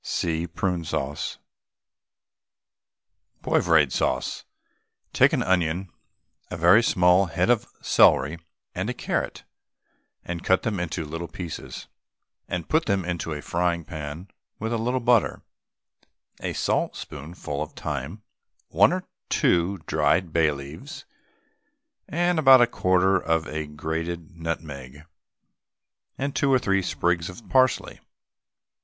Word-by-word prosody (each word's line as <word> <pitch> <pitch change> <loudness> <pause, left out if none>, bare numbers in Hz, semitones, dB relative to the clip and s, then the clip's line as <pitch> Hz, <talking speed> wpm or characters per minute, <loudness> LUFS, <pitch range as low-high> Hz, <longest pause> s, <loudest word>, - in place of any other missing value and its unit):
(See 85 0 -1
PRUNE 90 0 -2
SAUCE.) 75 -2 -3 2.1
POIVRADE 80 -6 +3
SAUCE. 65 - -1 0.7
Take - - +5
an - - +1
onion, 90 0 0 0.6
a 90 - -5
very 85 +7 +6
small 90 -3 +4
head 90 +6 +1
of 120 -3 +1 0.2
celery, 75 +6 +4 0.3
and - - -3
a - - -3
carrot, - - -3 0.8
and 85 -1 -5
cut 95 - +2
them 105 -5 -1
into 85 -1 -3
little 80 +3 -5
pieces, 85 0 -7 0.6
and 85 -3 -4
put 160 +1 +1
them 100 -4 +1
into 85 -2 -3
a 75 -1 -5
frying 85 -1 -1
pan 80 +3 -7 0.3
with 110 +2 -3
a 115 - 0
little 125 +3 0
butter, 120 -2 +2 1.0
a - - -3
saltspoonful 75 -1 -3
of - - -5
thyme, 75 - -5 0.5
one - - +5
or 185 0 -3 0.2
two 90 +3 +2
dried 80 +3 +1
bay 80 -2 +4
leaves, 75 - -8 1.0
and 175 +1 +1
about 135 -3 +8
a 120 - +7
quarter 95 -4 +2
of 80 -1 0
a 80 0 -4
grated 80 +3 -4
nutmeg 75 -4 -6 1.1
and 140 +1 -3
two 140 - +2
or 130 - +6
three 100 -5 +1
sprigs 85 -1 0
of 90 +6 -12
parsley. 130 -1 +2
85 Hz, 125 wpm, -25 LUFS, 80-100 Hz, 2.1 s, about